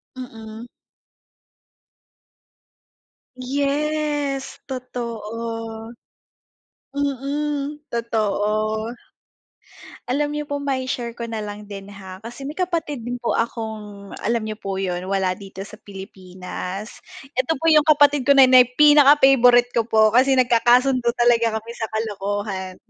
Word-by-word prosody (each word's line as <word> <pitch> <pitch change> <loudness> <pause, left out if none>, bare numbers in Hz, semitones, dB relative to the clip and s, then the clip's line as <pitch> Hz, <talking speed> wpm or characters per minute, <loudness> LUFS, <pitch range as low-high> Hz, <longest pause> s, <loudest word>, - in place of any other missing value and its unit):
Mm. 225 -2 -9 2.7
Yes, 285 +1 -2
totoo. 230 -3 -6 1.0
Mm, 285 +1 -2
totoo. 215 -1 -1 1.1
Alam 290 +4 0
niyo 300 - -3
po 285 -1 -4
mai-share 260 -4 -3
ko 235 - -5
na 225 -2 -4
lang 210 0 -7
din, 200 -1 -9
ha, 190 -2 -11
kasi 240 +4 -9
may 285 - -4
kapatid 335 -7 -2
din 245 0 -3
po 240 -1 -2
akong 215 -3 -4
alam 230 0 -1
niyo 215 - -4
po 195 -2 -4
'yun, 185 -1 -3
wala 190 -2 +1
dito 195 0 -9
sa 215 +1 -13
Pilipinas. 190 +2 -8 0.3
Ito 260 +5 0
po 295 - -9
'yung 305 -1 +5
kapatid 290 -2 +4
ko 280 - +6
na 270 - +9
'yun 255 -1 +6
pinaka-favorite 270 -5 +6
ko 230 -1 0
po 220 -1 +4
kasi 265 +2 +4
nagkakasundo 250 +1 +3
talaga 235 -2 +3
kami 225 +1 -7
sa 225 -2 -5
kalokohan. 205 -3 -4
235 Hz, 115 wpm, -22 LUFS, 210-275 Hz, 2.7 s, na